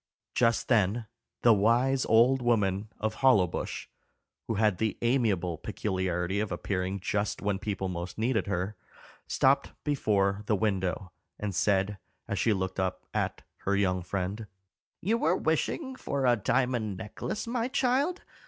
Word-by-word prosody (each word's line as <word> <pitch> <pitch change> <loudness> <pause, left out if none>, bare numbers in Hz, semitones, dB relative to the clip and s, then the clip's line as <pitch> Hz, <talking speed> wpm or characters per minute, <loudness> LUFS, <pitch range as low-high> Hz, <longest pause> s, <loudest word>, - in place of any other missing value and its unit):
Just 115 -1 +2
then 110 0 +2 0.4
the 120 - +7
wise 120 +6 +3
old 125 +4 +5
woman 105 -4 +1
of 110 0 -2
Hollowbush, 105 -10 +2 0.6
who 115 - -1
had 105 -3 +2
the 110 -3 0
amiable 100 - +1
peculiarity 95 -2 -1
of 105 -2 -2
appearing 95 +2 -2
just 100 +2 -1
when 100 -1 -1
people 100 -2 -2
most 90 -1 -5
needed 110 -2 0
her, 100 +1 -2 0.5
stopped 135 +1 +2
before 105 -8 +1
the 105 - +3
window, 95 -3 -1 0.3
and 105 -2 -3
said, 95 +1 +1 0.3
as - - -2
she 115 - +3
looked 95 -1 -1
up 95 -1 -2
at - - -2
her 100 - 0
young 95 -2 +1
friend, 95 +4 -3 0.5
"You 225 +6 +1
were 175 0 +2
wishing 260 - -1
for 140 - -2
a 120 -1 +5
diamond 120 -2 0
necklace, 110 - -5
my 235 0 -1
child. 280 +7 +1
105 Hz, 145 wpm, -29 LUFS, 95-125 Hz, 0.6 s, the